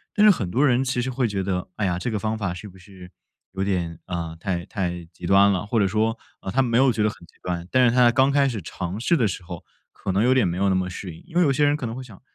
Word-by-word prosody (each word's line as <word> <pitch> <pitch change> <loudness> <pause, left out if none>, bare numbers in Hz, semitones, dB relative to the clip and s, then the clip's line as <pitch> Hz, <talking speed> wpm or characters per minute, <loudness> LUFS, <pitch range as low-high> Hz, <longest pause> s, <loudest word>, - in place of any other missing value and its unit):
但 210 -1 +5
是 210 - +9
很 110 - -2
多 130 +10 +2
人 125 -2 +3
其 125 -1 0
实 130 - -2
会 125 -1 0
觉 100 -3 -2
得， 90 -1 -2
哎 105 - -1
呀， 90 -2 0
这 120 - -2
个 110 - -1
方 110 +2 -2
法 100 -5 -2
是 95 +4 -9
不 95 - -16
是 90 -1 -14 0.4
有 95 - -5
点， 90 -4 -1
呃， 85 -2 -4
太 85 -1 -3
太 90 -4 -3
极 90 0 -10
端 100 +1 +6
了， 95 0 -1
或 110 +2 0
者 100 - +3
说， 110 +3 0 0.2
呃， - - -6
他 135 +7 +2
没 120 -3 +1
有 130 -1 +4
觉 110 - 0
得 105 - +3
很 85 -5 -12
极 - - -24
端， 85 -1 -3
但 130 +3 +3
是 - - 0
他 125 -1 +6
刚 130 +3 +3
开 140 0 +3
始 115 -6 -3
尝 90 +3 -5
试 145 +9 +2
的 115 - +2
时 95 -1 -5
候 85 -1 -9 0.3
可 95 - -4
能 100 +3 +2
有 125 +2 +4
点 125 -7 +3
没 85 - -2
有 100 +2 +1
那 95 - +2
么 90 0 -1
适 90 -1 -7
应。 80 - -14
因 170 - -15
为 175 - +4
有 150 -5 +4
些 145 +2 +2
人 145 0 +3
可 150 -4 -4
能 115 - -4
会 130 - -6
想， 115 -7 -13
100 Hz, 335 characters per minute, -23 LUFS, 90-125 Hz, 0.4 s, 是